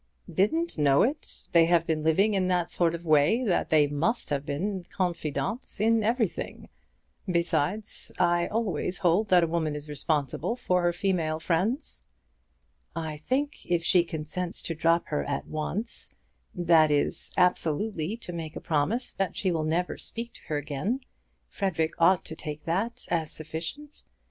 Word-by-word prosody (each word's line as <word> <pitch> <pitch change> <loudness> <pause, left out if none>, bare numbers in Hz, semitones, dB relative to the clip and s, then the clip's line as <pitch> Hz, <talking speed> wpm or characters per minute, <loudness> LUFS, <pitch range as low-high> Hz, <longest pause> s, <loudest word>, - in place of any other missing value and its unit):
"Didn't 320 - +1
know 140 -2 +5
it! 285 +6 -3
They 165 -1 +6
have 170 -1 +3
been 160 -2 0
living 190 +7 +3
in 190 -2 +1
that 180 -2 0
sort 170 -1 +2
of 170 +1 -9
way 155 - +4
that 195 -7 +1
they 155 -2 +5
must 150 +9 -1
have 140 0 -1
been 185 +6 -2
confidantes 170 - -2
in 225 +1 +3
everything. 225 -2 -1 0.6
Besides, 175 +3 0
I 175 0 +2
always 195 -5 -1
hold 185 +5 +2
that 180 -2 +6
a - - +2
woman 160 -2 -1
is 150 0 -6
responsible 150 - -1
for 180 -7 +1
her 175 0 +2
female 170 -4 0
friends." 185 - 0 0.9
"I 160 -2 -4
think 275 - -2
if 170 -1 +1
she 175 +1 +4
consents 165 +2 -4
to 165 - -3
drop 165 +1 +2
her 150 - 0
at 140 -1 -3
once, 185 +9 -2 0.4
that 170 -3 +5
is, 145 -1 +1
absolutely 180 +2 +1
to 180 -6 -8
make 160 -2 -6
a - - -4
promise 170 - 0
that 195 -3 -2
she 190 - 0
will 160 -2 0
never 170 +3 -1
speak 230 +1 -5
to - - -14
her 150 - -1
again, 150 - -2 0.5
Frederic 170 -6 -1
ought 175 +2 +4
to 160 - -6
take 150 -1 -6
that 195 +8 -1
as 160 -2 0
sufficient. 160 - -6
170 Hz, 160 wpm, -27 LUFS, 155-200 Hz, 0.9 s, They